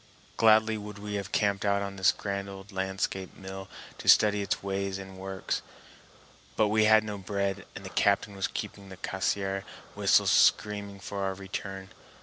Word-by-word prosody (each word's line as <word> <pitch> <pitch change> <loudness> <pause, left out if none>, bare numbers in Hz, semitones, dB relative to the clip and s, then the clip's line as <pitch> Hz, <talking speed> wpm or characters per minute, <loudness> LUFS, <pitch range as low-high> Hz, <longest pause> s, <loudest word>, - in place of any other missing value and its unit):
Gladly 110 0 +5
would 105 0 -8
we 105 0 -6
have 100 -1 -3
camped 100 -3 +1
out 100 0 +2
on 100 0 -5
this 95 -1 +4
grand 100 -1 -4
old 95 +1 -10
landscape 95 0 -3
mill 95 0 -8 0.3
to - - -8
study 105 -1 +6
its 100 - -2
ways 100 0 -2
and 95 -1 -9
works; 95 0 -3 0.9
but 110 -1 +3
we 110 +1 +4
had 110 0 +6
no 105 -2 -5
bread 100 0 -2
and 95 - -8
the - - -5
captain 100 +2 +2
was 95 - -1
keeping 100 -1 -6
the 95 - -10
Cassiar 95 +1 -1 0.3
whistle - - +4
screaming 100 -1 +3
for 100 0 -5
our 95 -1 -1
return. 95 0 -6
100 Hz, 170 wpm, -29 LUFS, 95-105 Hz, 0.9 s, study